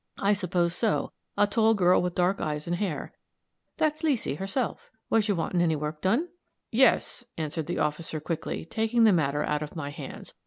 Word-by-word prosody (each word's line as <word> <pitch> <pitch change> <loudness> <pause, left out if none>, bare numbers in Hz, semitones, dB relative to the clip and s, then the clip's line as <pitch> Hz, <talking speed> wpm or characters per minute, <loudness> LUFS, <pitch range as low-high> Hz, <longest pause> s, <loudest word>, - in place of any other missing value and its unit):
I 200 +1 +3
suppose 175 -3 0
so 215 +4 0 0.3
a 205 - +5
tall 220 +2 +3
girl 180 -2 +4
with 180 -1 -2
dark 180 +2 +1
eyes 150 -1 -2
and 175 - -1
hair." 180 -6 -3 0.6
"That's 310 -1 +1
Leesy, 265 - 0
herself. 195 - -3 0.2
Was 225 -1 +3
you 205 - +2
wanting 175 +1 0
any 165 -2 +2
work 150 +1 -4
done?" 235 - +1 0.4
"Yes," 245 0 +3
answered 155 0 -3
the 175 - -2
officer, 155 +1 -1
quickly, 160 0 -4
taking 225 +5 +1
the 215 -3 +6
matter 150 -3 +1
out 150 0 -1
of 150 +2 -6
my 145 -3 -4
hands. - - -9
180 Hz, 185 wpm, -27 LUFS, 155-220 Hz, 0.6 s, the